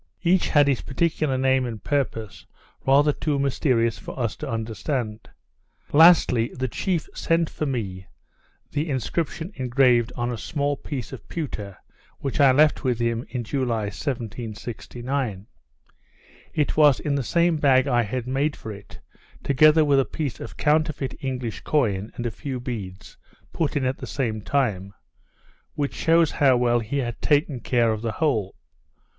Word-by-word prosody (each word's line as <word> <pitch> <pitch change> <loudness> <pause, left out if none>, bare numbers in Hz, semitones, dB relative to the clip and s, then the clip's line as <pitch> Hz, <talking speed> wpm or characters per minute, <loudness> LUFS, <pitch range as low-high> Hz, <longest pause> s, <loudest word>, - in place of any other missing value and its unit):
Each 180 +1 +3
had 145 -2 +5
its 135 -3 +1
particular 155 -1 0
name 130 0 +2
and 110 -4 -7
purpose, 125 -7 -2 0.4
rather 145 +2 +5
too 150 -1 -1
mysterious 125 -4 +1
for - - -9
us 120 -4 -1
to - - -6
understand. 110 0 -3 0.6
Lastly, 145 -7 +6
the 130 0 -2
chief 170 - -2
sent 165 -1 +1
to 150 - -3
me 95 -8 -4 0.6
the 150 +2 -2
inscription 160 - -2
engraved 125 -2 +2
on 120 0 -2
a 115 - -5
small 145 +2 -1
piece 135 -3 -6
of 130 - -10
pewter, 105 - -5 0.4
which 135 - -4
I 140 -2 +7
left 150 +3 +3
with 125 -3 +1
him 115 0 -1
in 125 -2 -3
July 115 -5 -2
1769. 120 -1 -4 1.1
It 150 - 0
was 150 -4 +5
in 145 - -2
the 140 - 0
same 170 +5 +2
bag 135 -3 +4
I 120 -3 +3
had 120 +2 -3
made 140 +4 0
for 110 - -8
it, 100 -1 -12 0.4
together 155 +3 +5
with 140 -2 +4
a - - +4
piece 145 -1 -4
of - - -8
counterfeit 155 -3 +1
English 125 -4 -3
coin, 110 -8 0
and 120 - -5
a 120 - -1
few 130 +7 -5
beads, 105 -7 -7 0.4
put 160 -3 -1
in 135 - 0
at 130 +1 -1
the 130 - -6
same 115 -4 -2
time; 100 -7 -1 0.8
which 145 -1 -2
shews 165 -1 +3
how 135 -3 +4
well 120 -1 +2
he 115 +5 -3
had 120 -5 -3
taken 145 -3 +1
care 120 -1 +2
of 110 -1 -3
the 115 -1 -2
whole. 110 -10 0
130 Hz, 160 wpm, -24 LUFS, 115-145 Hz, 1.1 s, I